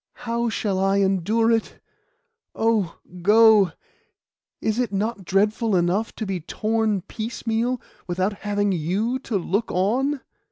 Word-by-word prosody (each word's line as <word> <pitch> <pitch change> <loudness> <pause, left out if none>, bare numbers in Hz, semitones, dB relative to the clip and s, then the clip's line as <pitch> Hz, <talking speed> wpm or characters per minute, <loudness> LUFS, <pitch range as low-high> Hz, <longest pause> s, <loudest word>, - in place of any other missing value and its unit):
How 235 0 0
shall 205 -3 -1
I 195 +1 +2
endure 200 +4 +2
it? 225 -1 -1 0.8
Oh, 220 -6 +1 0.2
go! 210 -1 +6 0.9
Is 220 +2 -1
it 245 -5 0
not 205 0 -2
dreadful 210 +3 +1
enough 180 +5 +1
to 220 - -4
be 190 -2 -2
torn 215 +4 -1
piecemeal, 230 +3 -2 0.3
without 185 +3 0
having 205 0 0
you 195 +9 -1
to 235 -5 -2
look 195 +5 -1
on? 255 +10 +1
210 Hz, 125 wpm, -23 LUFS, 195-230 Hz, 0.9 s, go